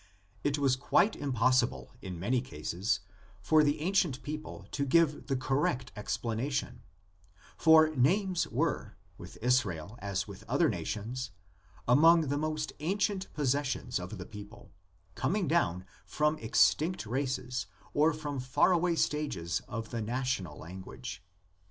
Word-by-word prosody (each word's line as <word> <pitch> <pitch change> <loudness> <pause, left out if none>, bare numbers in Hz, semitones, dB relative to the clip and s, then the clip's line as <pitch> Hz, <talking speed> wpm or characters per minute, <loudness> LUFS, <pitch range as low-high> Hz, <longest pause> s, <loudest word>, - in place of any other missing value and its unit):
It 145 0 +1
was 135 -3 +3
quite 185 +10 +3
impossible 125 - +1
in 90 -3 -6
many 120 +7 +1
cases 95 0 -2 0.4
for 155 +5 +4
the 145 +1 +1
ancient 170 -6 +1
people 150 +1 -6
to 140 - -1
give 150 +1 +2
the 135 - 0
correct 130 -1 0
explanation, 115 +5 -2 0.7
for 160 0 +7
names 180 +8 +2
were, - - -2 0.2
with - - -10
Israel 115 -5 0
as 100 -1 -2
with 100 -2 -10
other - - +3
nations, 120 +5 -3 0.6
among 160 +4 +6
the 145 - 0
most 155 0 -2
ancient 190 +4 -1
possessions 140 -4 0
of 90 +4 -7
the 90 - -7
people, 105 +2 -11 0.4
coming 180 - 0
down 95 - +1 0.2
from 150 +12 +1
extinct 155 +8 +2
races 130 0 -2 0.3
or 155 +2 +4
from 150 -3 -4
far 130 +8 +3
away 175 -1 +2
•stages 95 - -1
of 115 -1 -5
the 115 - -2
national 125 -4 -2
language. 95 +5 -8
130 Hz, 130 wpm, -31 LUFS, 110-155 Hz, 0.7 s, for